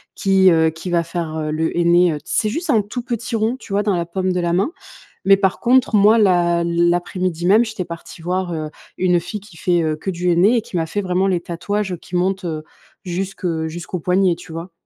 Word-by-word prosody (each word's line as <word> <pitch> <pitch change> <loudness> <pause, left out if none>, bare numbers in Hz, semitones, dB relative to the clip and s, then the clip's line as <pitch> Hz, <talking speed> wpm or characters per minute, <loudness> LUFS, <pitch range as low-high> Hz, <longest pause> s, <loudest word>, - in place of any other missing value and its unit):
qui, 190 -1 +4
heu, 160 -2 +4
qui 165 +3 -7
va 170 -1 +2
faire, 170 -2 -4
heu, 155 -1 -2
le 160 +2 -1
henné, 175 0 +4
heu, - - -3
c'est 215 - 0
juste 325 +9 -4
un 230 -7 +4
tout 210 +5 -5
petit 235 -1 -3
rond 225 +3 0
tu 210 - -9
vois? 205 +1 +2
Dans 200 -3 +1
la 170 - -1
paume 185 +2 -2
de 180 - -1
la 170 -1 0
main. 195 - +1 0.5
Mais 195 0 +6
par 195 -1 0
contre 250 -1 +3
moi 210 +2 +6
l'a 175 -4 +3
l'après-midi 175 0 0
même 215 +5 +5
j'étais 220 -5 -5
partie 170 0 -10
voir, 180 +1 -2
heu, 155 -2 -4 0.3
une 180 -1 +2
fille 180 +5 -6
qui 195 -4 -16
fait, 175 +1 +1
heu, 155 -1 0
que 155 +5 -4
du 180 0 -2
henné 190 +8 +4
et 230 - +1
qui 190 - -7
m'a 165 -1 0
fait 205 +5 -2
vraiment 185 0 0
les 185 -2 +1
tatouages, 190 +4 -3
heu, - - -3
qui 175 +1 -6
montent, 190 +2 0
heu, 155 -2 -4 0.4
jusque 185 +1 -4 0.2
jusqu'au 175 +2 -6
poignet, 180 +1 +2
tu 170 0 -13
vois? 165 +2 -7
180 Hz, 235 wpm, -20 LUFS, 170-195 Hz, 0.5 s, Mais